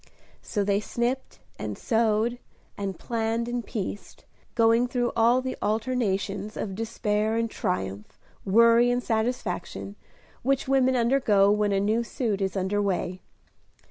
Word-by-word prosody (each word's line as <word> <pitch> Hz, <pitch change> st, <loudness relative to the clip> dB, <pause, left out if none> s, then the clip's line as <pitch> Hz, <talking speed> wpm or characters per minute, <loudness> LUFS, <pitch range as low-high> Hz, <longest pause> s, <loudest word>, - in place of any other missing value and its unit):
So 205 Hz, -, -2 dB
they 200 Hz, 0 st, +2 dB
snipped 240 Hz, +4 st, -2 dB, 0.2 s
and -, -, -4 dB
sewed, 230 Hz, 0 st, +1 dB, 0.4 s
and 195 Hz, -3 st, -4 dB
planned 230 Hz, 0 st, -1 dB
and 240 Hz, 0 st, -2 dB
pieced, 200 Hz, -4 st, -6 dB, 0.3 s
going 230 Hz, +1 st, +4 dB
through 245 Hz, -1 st, 0 dB
all 235 Hz, +3 st, +4 dB
the 260 Hz, -, -3 dB
alternations 210 Hz, -3 st, -1 dB
of 195 Hz, -, -3 dB
despair 215 Hz, 0 st, -1 dB
and 230 Hz, 0 st, +1 dB
triumph, 95 Hz, +3 st, -3 dB, 0.3 s
worry 230 Hz, +4 st, +5 dB
and 245 Hz, 0 st, 0 dB
satisfaction, 220 Hz, -4 st, -2 dB, 0.5 s
which 270 Hz, +1 st, 0 dB
women 260 Hz, -1 st, +3 dB
undergo 230 Hz, -5 st, +4 dB
when 210 Hz, 0 st, +2 dB
a 195 Hz, -, +2 dB
new 215 Hz, +4 st, +1 dB
suit 220 Hz, -3 st, -2 dB
is 190 Hz, 0 st, -1 dB
under 190 Hz, +2 st, 0 dB
way. 185 Hz, -2 st, -2 dB
220 Hz, 135 wpm, -26 LUFS, 200-240 Hz, 0.5 s, worry